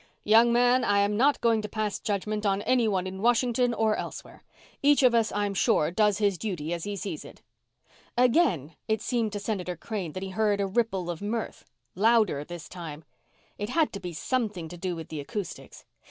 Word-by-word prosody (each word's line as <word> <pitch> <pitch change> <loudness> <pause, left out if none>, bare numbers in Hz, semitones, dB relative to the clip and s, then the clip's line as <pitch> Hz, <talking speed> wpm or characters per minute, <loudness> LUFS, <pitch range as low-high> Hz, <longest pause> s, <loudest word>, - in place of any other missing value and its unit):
"Young 225 +3 +5
man, 245 +1 +4
I 205 -3 +2
am 200 +1 +2
not 275 +6 +3
going 230 -2 +3
to 210 - -6
pass 215 -1 -2
judgment 210 +1 -2
on 200 -1 +1
anyone 220 -7 +2
in 190 +1 -6
Washington 240 +1 +2
or 220 -2 +1
elsewhere. - - -7 0.4
Each 285 0 +4
of 250 -2 +6
us, 230 -1 +2
I'm 205 -1 -1
sure, 155 -3 +2
does 210 +2 +2
his 200 -4 +1
duty 175 -7 -3
as 170 -1 -4
he 205 0 -3
sees 190 -4 -5
it." - - -14 0.7
Again 230 - +2
it 220 -1 0
seemed 230 -4 0
to 205 - -3
Senator 195 -4 -3
Crane 185 -4 -5
that 185 - -5
he 195 - -4
heard 205 +1 +1
a 200 - +1
ripple 195 -4 -1
of 170 - -7
mirth 220 +2 -4 0.3
louder 215 -7 +3
this 175 0 -9
time. 165 -3 -8 0.6
It 205 +1 -3
had 315 +4 +1
to 200 - -5
be 180 - -6
something 200 0 -2
to 175 - -8
do 180 0 -3
with 165 -1 -8
the 155 - -5
acoustics. 180 +4 -7
205 Hz, 195 wpm, -27 LUFS, 180-230 Hz, 0.7 s, of